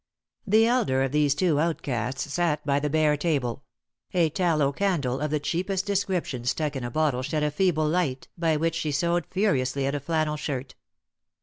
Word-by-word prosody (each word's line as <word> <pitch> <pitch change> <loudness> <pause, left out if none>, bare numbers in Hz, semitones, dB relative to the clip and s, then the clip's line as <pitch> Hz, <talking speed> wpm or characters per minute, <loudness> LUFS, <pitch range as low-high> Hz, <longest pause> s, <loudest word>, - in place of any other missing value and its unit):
The 220 +3 +5
elder 225 - +2
of 135 - -1
these 145 -1 +2
two 160 -4 +2
outcasts 135 -4 -2
sat 155 -4 0
by 140 -1 +2
the 150 +1 -1
bare 155 0 +3
table; 140 -5 -1 0.5
a 165 -3 +3
tallow 160 -5 +1
candle 145 -8 0
of 150 - -1
the 150 +1 0
cheapest 185 +6 -1
description 190 -10 -1
stuck 150 +3 -1
in 130 - -4
a 120 - -3
bottle 145 -1 0
shed 150 +3 -1
a 150 - +1
feeble 155 -2 +1
tight, 155 -7 -1
by 165 -3 +1
which 165 +1 0
she 160 -2 -2
sewed 170 +4 0
furiously 140 -9 0
at 140 - -1
a 145 - -1
flannel 155 +1 -1
shirt. 135 -3 -4
150 Hz, 185 wpm, -26 LUFS, 140-170 Hz, 0.5 s, The